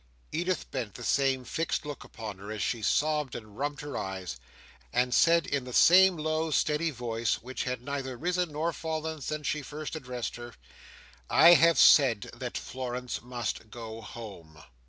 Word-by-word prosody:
Edith 175 +3 -2
bent 120 -7 -4
the - - -8
same 135 -2 +1
fixed 165 +1 -2
look 145 -1 -6
upon 105 -4 -8
her, 100 +2 -8
as 110 - -3
she 115 - -1
sobbed 150 +3 +1
and 110 -3 -9
rubbed 145 +3 -3
her 145 -1 -6
eyes; 95 -6 -4 0.5
and 125 0 +1
said 170 +2 +5
in 140 -2 -1
the 125 -1 -8
same 185 +1 +7
low 155 +1 -1
steady 150 +2 +1
voice, 115 -4 -1
which 130 +1 -4
had 125 -1 -3
neither 135 -2 -4
risen 180 +1 -1
nor 160 +3 -1
fallen 160 -1 -4
since 150 +2 -4
she 150 +1 -1
first 150 +3 -6
addressed 125 -6 -5
her, 120 0 -9 0.7
"I 170 +2 +8
have 165 +1 +5
said 125 -8 +6
that - - -5
Florence 125 -1 -5
must 120 -3 -4
go 115 0 -8
home." 95 -9 -10
130 Hz, 170 wpm, -29 LUFS, 120-155 Hz, 0.7 s, I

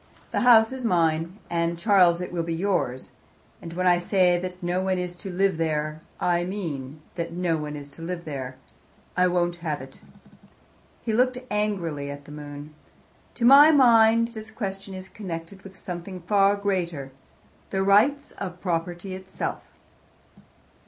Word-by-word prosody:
The - - 0
house 225 -2 +6
is 260 -1 -6
mine 170 -3 +1
and, 170 0 -1
Charles, 180 -3 +4
it 180 - -5
will 175 -1 -1
be 165 0 -2
yours 165 -9 -1 0.5
and 165 - -8
when 185 +1 -1
I 175 -1 +5
say 180 0 +3
that 180 0 -6
no 175 +1 0
one 190 0 0
is 180 -1 -4
to 195 - -7
live 190 -1 +1
there, 155 -1 -1 0.2
I 175 -1 +1
mean 155 -7 -5
that 170 -1 -4
no 175 -2 0
one 150 0 -5
is 145 -1 -9
to 165 - -12
live 170 +1 -5
there. 130 -4 -5 0.6
I 180 0 +4
won't 175 -1 0
have 160 -4 -3
it." - - -12 1.0
He 225 - -1
looked 250 +2 +2
angrily 180 -9 -1
at 145 0 -8
the 150 - -12
moon. 145 0 -9 0.6
"To 235 - 0
my 280 +4 +9
mind 230 -5 +5
this 220 -2 -8
question 195 -3 -5
is 185 0 -8
connected 190 -1 -7
with 195 -1 -13
something 180 0 -7
far 200 +2 +3
greater, 175 -9 -2 0.6
the 190 0 0
rights 235 +9 +3
of 180 -2 -7
property 175 +1 -3
itself." 190 0 -5
180 Hz, 160 wpm, -25 LUFS, 165-200 Hz, 1.0 s, my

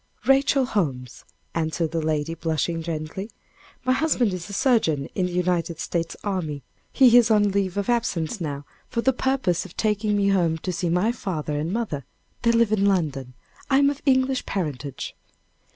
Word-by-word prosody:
"Rachel 270 0 +4
Holmes," 135 - -3 0.3
answered 160 -1 -1
the 165 -1 -1
lady, 155 0 -1
blushing 165 0 -1
gently. 165 +5 -5 0.6
"My 255 - +3
husband 255 -8 +1
is 175 0 -6
a - - -7
surgeon 195 - +2
in 185 -2 0
the - - -6
United 175 -2 0
States 170 -1 -2
army. 160 -9 -3 0.3
He 250 -3 +6
is 235 -1 +5
on 205 -2 +4
leave 195 -1 -1
of 200 - -1
absence 220 -6 -1
now 145 -3 -4 0.2
for 235 - -1
the 265 +2 +3
purpose 255 -9 0
of 190 - -13
taking 210 -1 +1
me 200 -1 +2
home 170 -4 +2
to 180 +3 -4
see 175 0 -1
my 180 +7 +2
father 160 -10 -3
and 160 +3 -2
mother 195 -11 -2 0.4
they 235 - +3
live 230 -2 +3
in 200 -2 +3
London. 140 -10 -1 0.3
I 270 - +4
am 280 0 +4
of 285 - -8
English 260 0 +2
parentage." 145 -7 -4
185 Hz, 175 wpm, -24 LUFS, 160-230 Hz, 0.6 s, He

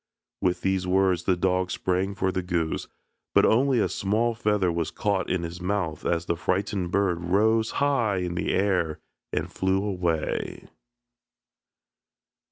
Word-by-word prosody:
With 90 -1 +1
these 95 -1 0
words 95 -1 +2
the 95 - +3
dog 90 0 +1
sprang 95 +3 -1
for 95 -1 0
the 95 - -1
goose, 85 -3 -2 0.5
but - - +6
only 130 +3 +3
a 110 - +3
small 110 +4 0
feather 105 -5 +1
was 85 -1 -1
caught 100 -2 -1
in 90 -2 0
his 85 +1 -6
mouth 90 -5 -2
as 85 0 0
the 85 - 0
frightened 95 +1 -1
bird 90 -3 +1
rose 110 +5 +3
high 130 -8 +2
in 90 -1 -2
the 85 - -1
air 90 -5 +1 0.3
and - - -2
flew 95 +1 +1
away. 90 -5 -2
95 Hz, 150 wpm, -26 LUFS, 90-100 Hz, 0.5 s, but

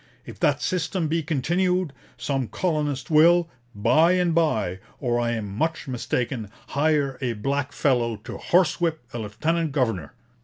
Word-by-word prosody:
If - - -10
that - - +2
system 180 -1 -1
be 165 +2 0
continued, 175 +3 0 0.2
some 135 -4 -1
colonist 150 -5 -2
will, 170 +2 +6 0.3
by 125 - +4
and 180 -2 +2
by, 110 - +1 0.2
or 120 -3 0
I 120 0 0
am 105 -4 -4
much 160 +7 -1
mistaken, 125 -3 -2 0.2
hire 145 -2 +1
a 125 -3 0
black 135 +5 -2
fellow 120 -5 +1
to - - -7
horsewhip 170 -2 +2
a 120 - -4
lieutenant 150 +10 -1
governor.' 110 - -1
145 Hz, 145 wpm, -24 LUFS, 120-165 Hz, 0.3 s, will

